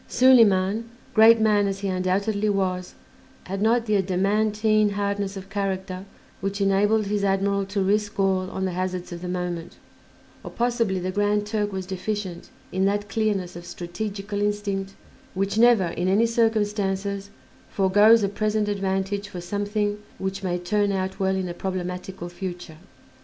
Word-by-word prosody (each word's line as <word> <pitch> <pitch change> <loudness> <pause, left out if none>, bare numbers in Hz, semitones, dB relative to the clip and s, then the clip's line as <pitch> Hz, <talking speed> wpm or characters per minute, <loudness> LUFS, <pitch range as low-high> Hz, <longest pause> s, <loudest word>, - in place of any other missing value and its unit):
Soliman, 225 -4 +4 0.3
great 225 +1 +7
man 210 -2 +3
as 195 0 -3
he 200 - -2
undoubtedly 195 +3 0
was, 185 -2 -1 0.5
had 195 +1 -5
not 230 +2 +3
the 215 -2 +2
adamantine 210 +3 +2
hardness 200 -1 -2
of 195 0 -10
character 190 -2 -3 0.3
which 195 +1 -3
enabled 205 +2 +2
his 205 0 -1
admiral 195 0 +1
to 200 0 -1
risk 205 +2 0
all 190 -1 +1
on 190 0 -3
the 185 - -1
hazards 185 0 -3
of 170 0 -7
the 180 - -5
moment; 180 -1 -4 0.7
or - - -6
possibly 235 -5 0
the 185 +1 -2
Grand 205 +1 +1
Turk 210 -1 -1
was 190 -1 -4
deficient 190 -1 -4 0.2
in 190 +1 +1
that 205 +1 0
clearness 200 -5 -1
of 175 - -8
strategical 200 +4 -5
instinct 200 -2 -2 0.4
which 195 +2 0
never 230 -7 +5
in 175 +2 -2
any 200 +5 +4
circumstances 205 -3 0 0.4
foregoes 205 +3 +5
a - - +3
present 210 +1 0
advantage 200 0 -2
for 180 - -7
something 205 +3 -2 0.2
which 190 +1 -3
may 180 -2 -1
turn 200 +3 0
out 190 -1 -2
well 190 0 +1
in 190 -1 -2
a 175 - -4
problematical 180 0 -5
future. 175 -2 -7
195 Hz, 155 wpm, -24 LUFS, 185-210 Hz, 0.7 s, great